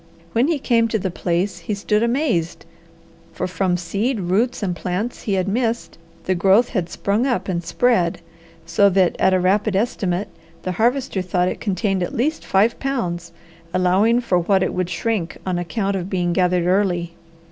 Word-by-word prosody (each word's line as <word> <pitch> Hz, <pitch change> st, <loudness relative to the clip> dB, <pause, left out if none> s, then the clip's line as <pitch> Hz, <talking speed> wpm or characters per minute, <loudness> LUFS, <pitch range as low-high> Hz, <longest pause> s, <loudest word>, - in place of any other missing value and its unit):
When 240 Hz, +5 st, +3 dB
he 330 Hz, -2 st, +1 dB
came 235 Hz, -4 st, +2 dB
to 225 Hz, -, 0 dB
the 190 Hz, -2 st, -3 dB
place 180 Hz, +2 st, -1 dB
he 210 Hz, +4 st, -3 dB
stood 210 Hz, +1 st, 0 dB
amazed, 235 Hz, -, 0 dB, 0.7 s
for -, -, -3 dB
from 185 Hz, -1 st, 0 dB
seed, 205 Hz, +8 st, -1 dB
roots, 205 Hz, +7 st, 0 dB
and 180 Hz, -3 st, -1 dB
plants 185 Hz, +7 st, -3 dB
he 205 Hz, -, -2 dB
had 190 Hz, 0 st, 0 dB
missed, 230 Hz, -1 st, -2 dB, 0.2 s
the 185 Hz, -, +1 dB
growth 195 Hz, +6 st, +4 dB
had 185 Hz, -7 st, -2 dB
sprung 205 Hz, +8 st, 0 dB
up 215 Hz, -7 st, -1 dB
and 175 Hz, -2 st, -2 dB
spread, 180 Hz, -2 st, +1 dB, 0.5 s
so 170 Hz, +5 st, +4 dB
that 185 Hz, -2 st, +2 dB
at -, -, +4 dB
a -, -, +2 dB
rapid 195 Hz, +3 st, +1 dB
estimate 195 Hz, -3 st, -1 dB, 0.3 s
the 185 Hz, -, -2 dB
Harvester 235 Hz, +1 st, 0 dB
thought 180 Hz, 0 st, 0 dB
it -, -, -6 dB
contained 195 Hz, -2 st, 0 dB
at 175 Hz, -, -3 dB
least 300 Hz, +7 st, 0 dB
five 210 Hz, +5 st, +2 dB
pounds, 175 Hz, -11 st, -3 dB, 0.4 s
allowing 195 Hz, +7 st, +3 dB
for 185 Hz, -7 st, +1 dB
what 190 Hz, +2 st, +2 dB
it -, -, -1 dB
would 180 Hz, -1 st, -1 dB
shrink 180 Hz, 0 st, -2 dB
on 180 Hz, -2 st, -1 dB
account 195 Hz, +3 st, -2 dB
of 185 Hz, -1 st, -3 dB
being 175 Hz, -3 st, 0 dB
gathered 180 Hz, -1 st, +2 dB
early. 180 Hz, -2 st, +1 dB
190 Hz, 180 wpm, -21 LUFS, 180-225 Hz, 0.7 s, growth